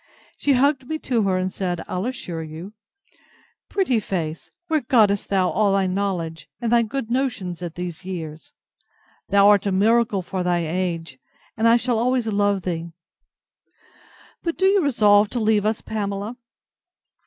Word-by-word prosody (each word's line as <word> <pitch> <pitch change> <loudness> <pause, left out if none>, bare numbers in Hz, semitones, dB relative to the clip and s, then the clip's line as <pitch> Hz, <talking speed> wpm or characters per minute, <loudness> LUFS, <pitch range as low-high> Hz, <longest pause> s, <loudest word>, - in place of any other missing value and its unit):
She 285 - +1
hugged 270 0 +2
me 315 - -2
to 250 -6 0
her, 190 -1 +1
and 185 0 -2
said 175 -3 -3
I'll 185 +5 -2
assure 180 -10 -5
you! 160 +6 -8 1.0
Pretty 320 - +1
face, 165 -6 -4 0.2
where 315 -2 +1
gottest 215 -5 +2
thou 190 -2 +2
all 205 -1 +2
thy 195 -1 +2
knowledge, 185 -4 -3
and 235 -2 -2
thy 240 -1 +5
good 230 +1 -4
notions, 240 -10 -2
at 170 -2 -6
these 175 -1 -6
years? 160 -4 -7 0.8
Thou 200 0 +5
art 205 -1 +5
a - - +1
miracle 215 0 +2
for 185 +1 -3
thy 175 -1 0
age, 165 -5 -3 0.4
and 225 +2 +2
I 230 +1 +6
shall 240 -1 0
always 250 0 +1
love 205 -3 +1
thee.—But, 170 - -10
do 380 - +2
you 390 0 +4
resolve 210 -7 +4
to 245 - -2
leave 215 -2 +2
us, 215 0 -1
Pamela? 205 +1 -4
200 Hz, 155 wpm, -22 LUFS, 180-235 Hz, 1.0 s, I